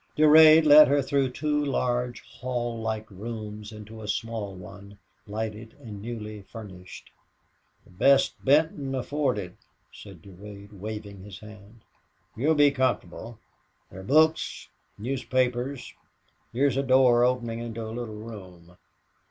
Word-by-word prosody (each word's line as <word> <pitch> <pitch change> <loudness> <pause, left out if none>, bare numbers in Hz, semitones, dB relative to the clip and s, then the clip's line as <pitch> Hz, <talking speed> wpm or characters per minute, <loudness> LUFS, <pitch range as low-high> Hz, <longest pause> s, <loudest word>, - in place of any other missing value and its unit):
Durade 155 +1 +7
led 150 0 +9
her 145 +1 +2
through 135 -1 0
two 150 +3 -1
large 125 -3 -1
hall 120 -2 -5
like 110 -1 -3
rooms 105 +1 -7
into 110 +1 -11
a 105 - -8
small 105 -2 -4
one, 100 +3 -12 0.3
light 110 +1 -3
and 110 -1 -11
newly 110 -2 -7
furnished. 95 -3 -12 0.7
"The - - -22
best 135 +9 +2
Benton 140 -1 +2
afforded," 125 -9 -2 0.3
said 95 -6 -13
Durade, 100 +2 -12
waving 105 -1 -8
his 100 0 -10
hand. 105 +1 -14 0.5
"You'll 150 +8 +1
be 145 -1 +5
comfortable. 120 -4 -2 0.5
There 95 - -10
are - - -9
books 155 +8 +2 0.3
newspapers. 125 +2 -2 0.6
Here's 135 +3 +1
a - - +2
door 130 -2 +4
opening 120 -2 0
into 115 -1 -6
a 110 - -7
little 115 -2 -6
room. 95 -6 -11
115 Hz, 125 wpm, -26 LUFS, 105-130 Hz, 0.7 s, led